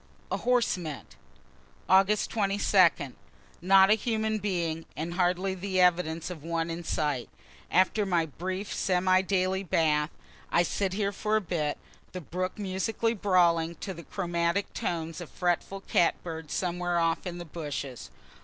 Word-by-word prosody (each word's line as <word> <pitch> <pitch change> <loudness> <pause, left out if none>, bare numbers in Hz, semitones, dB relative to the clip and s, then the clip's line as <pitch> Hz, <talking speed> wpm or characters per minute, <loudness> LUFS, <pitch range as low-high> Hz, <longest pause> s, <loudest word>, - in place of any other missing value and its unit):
HORSE 245 -6 +1
MINT 155 -5 -7 0.7
Aug. 195 +2 +4
22. 195 - +2 0.5
Not 190 +2 +6
a - - +9
human 220 -1 0
being, 170 -5 -2
and 165 +2 -3
hardly 185 +1 +1
the 190 0 -2
evidence 170 -2 +2
of 160 -5 -8
one, 165 0 -2
in 170 +1 -5
sight. 150 -6 -1 0.4
After 190 +4 +3
my 175 -4 +1
brief 185 +6 -5
semi 185 0 +2
daily 190 0 0
bath, 155 -4 +1 0.4
I 170 - +4
sit 190 +2 -1
here 200 0 0
for 215 +2 -1
a - - +4
bit, 160 -5 -2 0.4
the 185 - -5
brook 185 +5 -4
musically 210 +3 -1
brawling, 170 -5 +2
to 190 - -4
the 170 - -9
chromatic 170 +1 -1
tones 165 0 -3
of 175 - -8
a - - -24
fretful 180 +2 -1
cat 175 - +2
bird 160 -2 -6
somewhere 175 0 -1
off 165 +2 +1
in 175 -1 -5
the 175 - -7
bushes. 145 -5 -6
180 Hz, 150 wpm, -28 LUFS, 165-195 Hz, 0.7 s, a